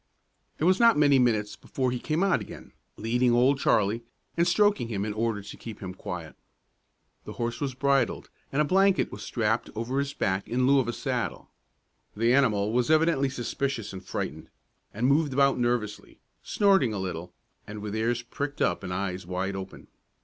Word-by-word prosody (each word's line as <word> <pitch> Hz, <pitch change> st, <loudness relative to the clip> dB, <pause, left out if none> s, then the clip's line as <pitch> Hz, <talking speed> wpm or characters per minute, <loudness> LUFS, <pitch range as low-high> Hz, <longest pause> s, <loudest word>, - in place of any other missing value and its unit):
It -, -, -4 dB
was 185 Hz, +3 st, +4 dB
not 235 Hz, -5 st, +6 dB
many 145 Hz, -2 st, +5 dB
minutes 110 Hz, -4 st, +1 dB
before 130 Hz, -2 st, -2 dB
he 125 Hz, -, -2 dB
came 155 Hz, +7 st, -1 dB
out 195 Hz, -, +2 dB
again, -, -, -10 dB, 0.3 s
leading 120 Hz, +3 st, +1 dB
Old 130 Hz, +3 st, +3 dB
Charlie, 110 Hz, -2 st, +2 dB, 0.3 s
and 170 Hz, +1 st, +2 dB
stroking 205 Hz, -, +3 dB
him 100 Hz, -3 st, -2 dB
in 105 Hz, -, -3 dB
order 110 Hz, -2 st, -1 dB
to -, -, -10 dB
keep 115 Hz, -3 st, -9 dB
him 95 Hz, -2 st, -6 dB
quiet. 85 Hz, -3 st, -7 dB, 0.9 s
The -, -, -7 dB
horse 120 Hz, +2 st, -3 dB
was 135 Hz, -3 st, -2 dB
bridled, 140 Hz, +1 st, 0 dB, 0.2 s
and 150 Hz, +3 st, +2 dB
a -, -, -1 dB
blanket 195 Hz, +4 st, +3 dB
was -, -, -8 dB
strapped 110 Hz, -1 st, -1 dB
over 120 Hz, +5 st, -2 dB
his 140 Hz, 0 st, -2 dB
back 95 Hz, +1 st, -1 dB
in 125 Hz, +2 st, +1 dB
lieu 140 Hz, +1 st, +5 dB
of 125 Hz, -, 0 dB
a -, -, 0 dB
saddle. -, -, -3 dB, 0.6 s
The 115 Hz, +3 st, +2 dB
animal 110 Hz, -7 st, +2 dB
was 125 Hz, +2 st, +1 dB
evidently 155 Hz, -3 st, +3 dB
suspicious 130 Hz, -3 st, -3 dB
and 95 Hz, 0 st, -8 dB
frightened, 80 Hz, -3 st, -5 dB, 0.4 s
and 110 Hz, +4 st, -2 dB
moved 140 Hz, +1 st, +3 dB
about 140 Hz, -1 st, +3 dB
nervously, 120 Hz, -4 st, -2 dB, 0.2 s
snorting 195 Hz, -, +2 dB
a -, -, -3 dB
little, 90 Hz, -2 st, -5 dB, 0.4 s
and 105 Hz, -, -7 dB
with 105 Hz, 0 st, -5 dB
ears 120 Hz, +2 st, 0 dB
pricked 140 Hz, +4 st, -5 dB
up 90 Hz, -, +1 dB
and 95 Hz, -, -5 dB
eyes 95 Hz, -1 st, -3 dB
wide 95 Hz, +2 st, -2 dB
open. 95 Hz, 0 st, -8 dB
120 Hz, 185 wpm, -27 LUFS, 105-140 Hz, 0.9 s, not